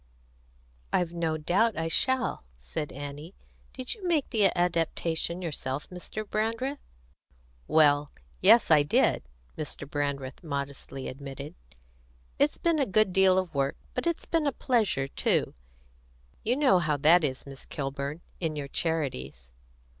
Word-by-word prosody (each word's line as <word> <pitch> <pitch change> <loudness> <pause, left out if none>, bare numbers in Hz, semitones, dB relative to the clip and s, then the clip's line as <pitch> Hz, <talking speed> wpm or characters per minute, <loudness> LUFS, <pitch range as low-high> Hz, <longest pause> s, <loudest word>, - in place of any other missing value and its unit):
"I've 175 -1 +1
no 165 -2 -1
doubt 195 +8 +2
I 165 0 -1
shall," 260 - +2
said 145 - -5
Annie. 145 +5 -8 0.4
"Did 255 -1 -4
you 430 - -14
make 320 -5 +1
the 215 -4 +3
adaptation 170 0 0
yourself, 145 -3 -3
Mr. 205 +4 -6
Brandreth?" 230 +7 -1 0.9
"Well, 145 -2 +4 0.3
yes, 230 -7 +6
I 155 -2 +7
did," 145 - +2 0.3
Mr. 150 -2 -4
Brandreth 140 -2 -3
modestly 140 -2 -4
admitted. 140 +2 -7 0.9
"It's 290 +1 +3
been 335 -2 +1
a 275 - +2
good 195 -1 +2
deal 190 -1 +5
of 185 -3 -1
work, 140 -1 0 0.2
but - - -2
it's 340 - -1
been 325 -3 +1
a - - +2
pleasure 220 - +1
too. - - 0 0.9
You 240 +3 +2
know 265 -11 +5
how 155 -4 0
that 160 +5 +5
is, 130 -3 -2
Miss 135 -1 -10
Kilburn, 140 +2 -4 0.2
in 160 -3 -2
your 145 -2 -4
charities." 125 - -2
165 Hz, 140 wpm, -28 LUFS, 140-215 Hz, 0.9 s, I